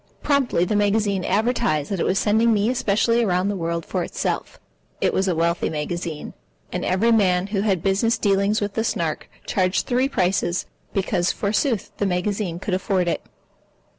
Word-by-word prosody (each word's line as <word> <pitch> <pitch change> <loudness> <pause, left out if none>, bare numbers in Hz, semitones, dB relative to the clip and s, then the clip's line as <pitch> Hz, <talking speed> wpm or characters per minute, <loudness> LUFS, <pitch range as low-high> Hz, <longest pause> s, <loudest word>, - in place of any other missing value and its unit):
Promptly 270 - +2
the 210 - -1
magazine 205 -2 +1
advertised 215 - 0
that 195 - -1
it - - +1
was 190 - +1
sending 220 +3 +3
me 215 +2 +2
especially 230 0 +2
around 185 -1 +1
the 205 - -1
world 170 -2 -2
for - - -2
itself. - - -3 0.4
It - - +1
was 195 - +1
a 180 - +1
wealthy 170 +1 +1
magazine. 160 +1 -4 0.4
And - - -2
every 195 +6 +2
man 185 -5 +3
who 200 -1 -1
had 195 -5 0
business 200 +4 +2
dealings 200 +1 +2
with 205 -1 -2
the 225 - 0
Snark 165 -8 -2 0.2
charged 185 -1 +1
three 255 +2 +1
prices 180 -5 0 0.3
because 190 -2 0
forsooth 215 +2 -1
the 205 - 0
magazine 185 -1 -1
could 190 +2 -4
afford 185 -1 0
it. 170 - 0
195 Hz, 170 wpm, -23 LUFS, 180-215 Hz, 0.4 s, sending